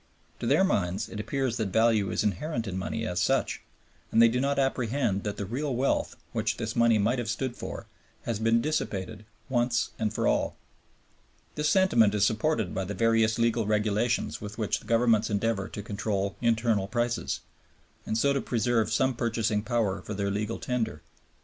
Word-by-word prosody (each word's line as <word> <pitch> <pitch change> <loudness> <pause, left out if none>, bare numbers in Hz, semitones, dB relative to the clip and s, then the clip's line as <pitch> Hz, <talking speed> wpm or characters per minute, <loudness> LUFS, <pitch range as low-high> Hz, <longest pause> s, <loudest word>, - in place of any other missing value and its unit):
To - - -3
their - - +4
minds 95 - 0
it 105 - -7
appears 130 +1 -1
that 110 -3 -1
value 110 0 +3
is - - 0
inherent 115 - -1
in 95 - -4
money 110 +4 -3
as 90 0 -1
such, - - +1 0.5
and - - +3
they 115 0 +8
do 125 +2 0
not 140 +1 0
apprehend 125 -5 0
that 105 -1 -3
the 100 - -3
real 130 +6 -2
wealth, 130 +3 0 0.2
which - - -1
this - - -4
money 115 -1 +4
might 115 +5 +1
have 115 -2 -3
stood 120 +2 -2
for, - - -6 0.4
has 115 -3 -2
been 115 +1 +3
dissipated 110 -7 -3 0.2
once 120 -2 +1
and 110 -2 0
for - - 0
all. - - +1 1.0
This 150 0 0
sentiment 120 - +4
is 105 -1 +3
supported 110 - 0
by 95 - -2
the 100 +2 -5
various 115 0 +3
legal 115 -2 +1
regulations 110 +2 0
with 105 0 -7
which 110 -3 0
the - - -17
Governments 115 -2 +3
endeavor 105 -1 0
to 105 - -7
control 100 -2 -2
internal 115 -4 +2
prices, 120 +1 -1 0.6
and 110 - -2
so 140 +4 +3
to 140 - 0
preserve 115 -1 +1
some 130 +4 +2
purchasing 115 -2 0
power 115 -4 0
for 105 - -6
their 100 0 -1
legal 105 +3 -2
tender. 110 -10 -3
115 Hz, 180 wpm, -28 LUFS, 105-120 Hz, 1.0 s, they